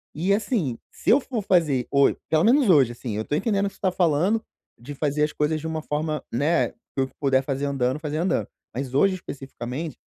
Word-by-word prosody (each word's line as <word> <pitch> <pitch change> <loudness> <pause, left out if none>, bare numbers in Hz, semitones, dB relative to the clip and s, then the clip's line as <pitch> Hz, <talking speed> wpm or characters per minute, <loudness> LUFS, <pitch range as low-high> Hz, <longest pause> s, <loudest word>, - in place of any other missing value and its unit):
E, 185 +6 +1
assim, 200 - 0
se - - -4
eu 265 - +6
for 240 -5 -3
fazer 150 -10 +2
ho 140 0 +5 0.2
pelo 160 +1 +3
menos 255 -2 +4
hoje, 135 -8 +5
assim, 115 -3 -5
eu 110 - -3
tô 145 - -1
entendendo 200 +1 +1
o - - -2
que - - -21
você - - -25
tá 190 -2 +2
falando, 180 +5 +2 0.4
de 140 +4 -8
fazer 150 +1 0
as 150 - +1
coisas 155 +1 0
de 160 - -4
uma 160 -1 -3
forma, 150 -1 -2
né, 150 +7 +2
que - - -30 0.2
eu 135 0 +2
puder 135 -1 +2
fazer 140 +1 -2
andando, 135 0 0
fazer 155 -1 -3
andando. 175 +4 0 0.3
Mas 130 -1 -4
hoje 190 +7 +4
especificamente 135 -1 -6
150 Hz, 220 wpm, -24 LUFS, 135-180 Hz, 0.4 s, eu